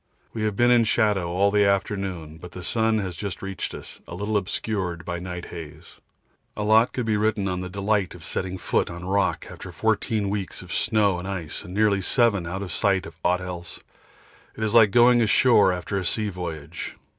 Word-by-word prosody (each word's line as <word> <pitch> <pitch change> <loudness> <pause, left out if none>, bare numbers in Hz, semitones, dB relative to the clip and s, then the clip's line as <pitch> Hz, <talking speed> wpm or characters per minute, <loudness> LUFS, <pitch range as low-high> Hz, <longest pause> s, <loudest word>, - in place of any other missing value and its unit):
We 110 - -4
have 105 -2 -1
been 120 +3 +4
in 120 -1 +6
shadow 105 -6 +2
all 100 +3 +2
the 105 0 +4
afternoon, 95 -5 -1
but 90 0 -11
the 90 - -8
sun 110 +2 +1
has 95 -4 -3
just 100 +2 -5
reached 95 0 -4
us, - - -10
a 85 - -7
little 105 +4 -2
obscured 95 -3 -2
by 85 - -3
night 90 -1 -6
haze. 80 -1 -10 0.6
A 105 - -1
lot 110 +3 +4
could 125 - -3
be 110 -2 +1
written 105 -1 +1
on 90 -1 -2
the 90 - -5
delight 100 0 0
of 85 - -12
setting 95 0 -3
foot - - 0
on 85 +1 -7
rock 100 +2 0
after - - -9
14 105 -2 0
weeks 100 -2 -4
of 90 - -8
snow 105 -5 +2
and 90 - -6
ice 85 -6 -5
and 90 +2 -9
nearly 105 -2 +3
7 105 -4 +2
out 95 +3 -4
of 95 - -6
sight 95 -2 +1
of 80 - -10
aught 90 +1 +2
else. 90 -1 -7 0.8
It 110 - -3
is 110 - 0
like 115 -3 +7
going 120 +3 +5
ashore 105 -2 +5
after 90 +2 -2
a - - -4
sea 105 +4 -1
voyage. 85 -6 -6
100 Hz, 205 wpm, -24 LUFS, 90-105 Hz, 0.8 s, like